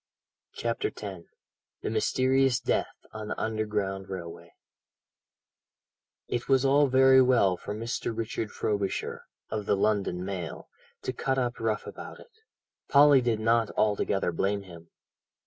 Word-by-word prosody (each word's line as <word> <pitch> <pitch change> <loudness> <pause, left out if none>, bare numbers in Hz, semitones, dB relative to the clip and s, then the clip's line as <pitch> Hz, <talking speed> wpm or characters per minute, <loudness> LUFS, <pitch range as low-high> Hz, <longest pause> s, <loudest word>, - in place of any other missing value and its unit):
CHAPTER 115 0 -2
X - - -9 0.8
THE - - -2
MYSTERIOUS 130 +3 +2
DEATH - - -1 0.2
ON 110 -1 -6
THE - - -4
UNDERGROUND 105 -3 -2
RAILWAY 85 -2 -8 1.7
It 120 +2 -3
was 135 0 +4
all 140 +1 +5
very 130 0 +6
well 120 -8 +4
for 105 - -6
Mr. 115 +2 -3
Richard 115 -1 -3
Frobisher 100 -3 -2 0.3
(of 105 -2 -3
the - - +3
London 100 -3 0
Mail) 90 -4 -5 0.4
to 130 - -2
cut 135 +2 -1
up 125 -2 -1
rough 110 -2 -1
about - - -9
it. 480 - -16 0.6
Polly 145 -1 +7
did 120 -3 0
not 115 0 +2
altogether 100 -3 +1
blame 100 +4 -1
him. 85 -3 -13
110 Hz, 130 wpm, -28 LUFS, 100-130 Hz, 1.7 s, Polly